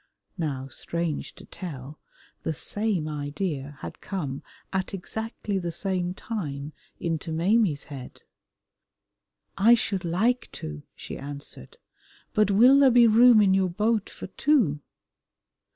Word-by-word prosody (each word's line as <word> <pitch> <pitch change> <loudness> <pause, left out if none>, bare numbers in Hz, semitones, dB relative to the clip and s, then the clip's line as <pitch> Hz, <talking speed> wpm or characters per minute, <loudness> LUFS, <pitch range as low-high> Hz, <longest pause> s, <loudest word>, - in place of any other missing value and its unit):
Now, 135 -5 -2
strange 165 +3 -4
to - - -13
tell, 150 -5 -8 0.4
the 160 - -2
same 205 0 -1
idea 145 -1 -4
had - - -8
come 145 -9 -4 0.3
at 190 +1 -1
exactly 210 +1 -4
the 175 -2 -3
same 180 +1 -2
time 150 -11 -5 0.3
into 165 -1 -2
Maimie's 175 -2 +2
head. 135 -3 -10 1.4
"I 230 +4 +7
should 195 -5 -2
like 215 +9 +1
to," 75 -1 -6
she - - -8
answered, 145 - -9 0.6
"but 215 -1 +3
will 245 +7 +7
there 275 -2 +7
be 240 -1 +6
room 230 0 +7
in 190 -2 +4
your 190 -1 +2
boat 210 +3 0
for - - -9
two?" 190 - +2
180 Hz, 125 wpm, -26 LUFS, 150-215 Hz, 1.4 s, I